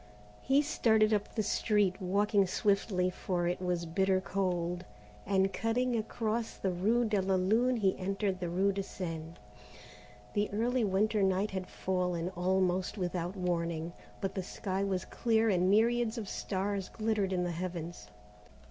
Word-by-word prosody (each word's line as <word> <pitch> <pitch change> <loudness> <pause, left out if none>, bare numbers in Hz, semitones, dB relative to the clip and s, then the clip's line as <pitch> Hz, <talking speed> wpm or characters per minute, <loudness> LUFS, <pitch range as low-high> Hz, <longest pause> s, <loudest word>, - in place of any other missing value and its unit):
He 275 +2 +3
started 220 -7 +3
up 205 -1 -1
the 220 - +1
street, 205 -2 +1
walking 200 +1 +2
swiftly, 190 -1 +1
for 175 -1 -2
it 175 +1 -1
was 180 -2 -1
bitter 190 +3 +2
cold, 180 -2 -1 0.4
and 195 0 +2
cutting 240 +3 0
across 225 0 -2
the 190 - -1
rue 220 +7 +2
de 210 -3 +1
la 190 0 +1
Lune 225 +7 +2
he 195 -4 +2
entered 195 0 -1
the 175 -2 -3
rue 190 +3 +2
de 195 0 -2
Seine. 165 -4 -6 1.0
The 205 0 +1
early 240 +4 0
winter 210 +2 +2
night 195 +2 +2
had 190 -1 -4
fallen, 180 -2 -1
almost 185 +1 0
without 180 0 -2
warning, 170 -2 -2 0.3
but 195 - -2
the 190 - -2
sky 190 +1 -3
was 190 -2 -1
clear 225 -1 +1
and 185 -2 +3
myriads 230 +2 +3
of 220 -3 -4
stars 195 0 -2
glittered 215 -3 -1
in 180 -1 0
the 175 - -1
heavens. 170 - -5
190 Hz, 155 wpm, -32 LUFS, 180-215 Hz, 1.0 s, He